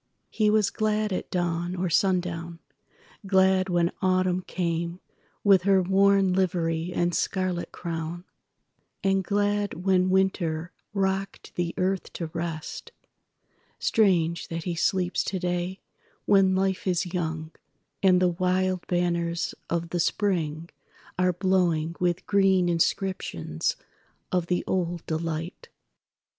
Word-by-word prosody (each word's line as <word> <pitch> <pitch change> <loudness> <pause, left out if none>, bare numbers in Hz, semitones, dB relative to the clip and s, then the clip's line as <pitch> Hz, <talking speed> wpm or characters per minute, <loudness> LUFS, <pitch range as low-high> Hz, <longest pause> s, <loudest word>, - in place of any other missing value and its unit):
He 215 -1 +2
was 210 -1 +3
gladAt 215 -2 -1
dawn 175 0 -1
or 185 0 -1
sundown; 170 -2 0 0.7
glad 190 0 +3
when 175 -1 +2
Autumn 185 -1 +2
cameWith 175 +2 -1
her 195 0 +4
worn 195 0 +4
livery 170 -2 0
and 175 0 0
scarlet 185 -2 -1
crown, 170 0 -5 0.8
And 195 0 +2
glad 205 -2 -1
when 185 -1 +3
Winter 180 -3 0 0.2
rocked 195 -1 -2
the 175 -1 -2
earth 190 +1 -1
to 165 -2 -5
rest. 165 -2 -5 0.9
Strange 170 -6 +2
that 165 0 -4
he 175 - -2
sleeps 180 +1 +1
today 180 0 -2 0.4
when 195 -2 +4
Life 190 0 0
is 180 0 +1
young, 160 -2 -3 0.5
And 185 -2 +5
the 180 -1 +3
wild 185 +1 0
banners 170 -1 0 0.2
of 170 0 -1
the 175 - -2
Spring 165 -4 -1 0.5
are 185 0 +4
blowingWith 175 -2 0
green 190 -3 +3
inscriptions 165 - -1 0.6
of 180 -2 0
the 180 0 0
old 175 -2 -2
delight." 165 - -4
180 Hz, 110 wpm, -26 LUFS, 170-190 Hz, 0.9 s, And